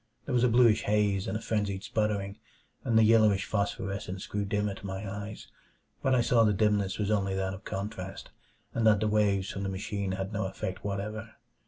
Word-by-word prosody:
There 140 - -3
was 120 -1 +3
a 125 - +5
bluish 115 -2 +5
haze 105 -2 +1
and - - -1
a - - -8
frenzied 100 -4 -1
sputtering, 105 -2 -1 0.4
and 115 - +2
the 110 - +7
yellowish 110 -3 +4
phosphorescence 100 -2 -3
grew 100 0 -2
dimmer 105 0 0
to 105 - -12
my 95 +2 -5
eyes. 105 +2 -6 0.6
But 130 -1 +3
I 125 - +4
saw 115 0 +4
the 105 -2 +3
dimness 105 -1 +1
was 105 0 -1
only 95 -2 +1
that 95 0 -1
of 95 +3 -10
contrast, 95 -1 -5 0.4
and 115 -1 +2
that 105 -2 +5
the 110 - +1
waves 100 -2 +2
from 100 - -5
the 100 - -2
machine 100 0 -3
had 95 +2 -4
no 105 -2 -1
effect 95 0 -5
whatever. 105 +3 -4
105 Hz, 200 wpm, -29 LUFS, 95-110 Hz, 0.6 s, the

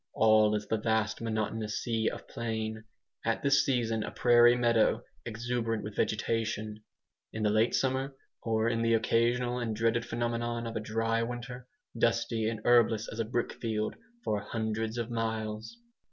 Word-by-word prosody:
All 110 -1 +5
is 105 0 -2
the 110 - 0
vast 110 0 0
monotonous 110 -1 -2
sea 115 -2 0
of - - -9
plain 110 -1 -4 0.4
at - - -1
this 140 -1 +4
season 115 -4 0
a - - -3
prairie 120 0 +5
meadow 120 -2 +2 0.2
exuberant 115 -1 -2
with 105 -1 -7
vegetation; 110 -1 -1 0.5
in 110 - -4
the 105 - +3
late 110 +2 +3
summer, 135 +1 0 0.3
or 110 0 +1
in 115 0 0
the 115 0 +3
occasional 120 +2 +1
and 115 -3 -2
dreaded 115 +1 +1
phenomenon 120 0 -2
of 115 0 -5
a - - 0
DRY 115 +1 0
WINTER, 125 +1 -5 0.3
dusty, 115 -1 +1
and 110 -1 -5
herbless 115 -2 +4
as 115 - -7
a 115 - +1
brickfield, 110 -1 -2 0.3
for 105 - 0
hundreds 110 +1 -3
of 120 0 -3
miles. 110 - -3
115 Hz, 155 wpm, -30 LUFS, 110-120 Hz, 0.5 s, All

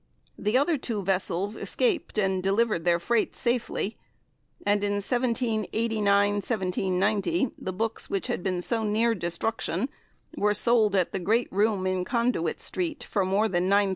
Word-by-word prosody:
The 210 +4 +2
other 290 +2 +2
two 220 -5 -3
vessels 190 +2 -1
escaped 390 - -1
and 190 -2 +1
delivered 195 -2 +1
their 170 -1 +4
freight 220 +6 0
safely, 235 -4 -1 0.7
and 205 0 +2
in 205 0 +1
1789 205 -4 0
90 220 - +1
the 185 - -4
books 225 +4 -2
which 195 -2 -2
had - - -2
been 180 -1 -1
so 225 +2 0
near 220 +2 +2
destruction 220 +7 -2 0.5
were 210 0 +2
sold 220 -2 +4
at 185 -3 +1
the 195 - -2
great 220 +7 0
room 200 -1 +1
in 185 -1 0
Conduit 235 -5 0
Street, 335 -4 -2
for 200 - 0
more 195 +4 +2
than 180 -1 0
L9,000. 200 0 +4
205 Hz, 150 wpm, -27 LUFS, 190-230 Hz, 0.7 s, their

